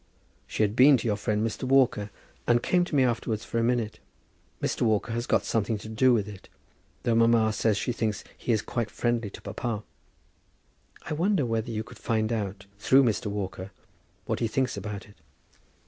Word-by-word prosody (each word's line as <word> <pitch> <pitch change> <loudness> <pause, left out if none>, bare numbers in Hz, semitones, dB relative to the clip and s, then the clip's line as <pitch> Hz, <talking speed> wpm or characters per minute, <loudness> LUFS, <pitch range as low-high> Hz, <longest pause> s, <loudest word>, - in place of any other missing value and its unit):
She - - 0
had 105 0 0
been 135 +2 +7
to 120 - -6
your 105 - +2
friend, 105 +1 -1
Mr. 115 - -4
Walker, 130 -6 +3 0.4
and 120 0 +3
came 180 -1 +3
to 160 - -4
me 135 - +5
afterwards 115 -3 -1
for 115 - -2
a - - +1
minute. 115 -3 0 0.6
Mr. - - -2
Walker 110 0 +1
has 120 +1 -2
got - - +2
something 110 0 0
to 105 - -10
do 115 +4 +3
with 110 -4 +2
it, 100 -3 -11 0.5
though 120 - +2
mamma 115 -1 +4
says 110 -2 +1
she 125 - -1
thinks 110 -3 -2
he - - -2
is 110 -2 +1
quite 115 -3 -2
friendly 120 -3 -1
to - - -12
papa. 115 -4 -3 1.2
I 155 - -4
wonder 175 -1 +1
whether 115 -1 -1
you 110 -1 -2
could - - -14
find 110 -1 0
out, 100 -3 -3
through 135 +6 +5
Mr. 115 -2 0
Walker, 95 -2 -4 0.6
what - - -2
he 115 - +1
thinks 130 +3 0
about 100 0 -6
it. 105 - -19
115 Hz, 195 wpm, -27 LUFS, 105-120 Hz, 1.2 s, been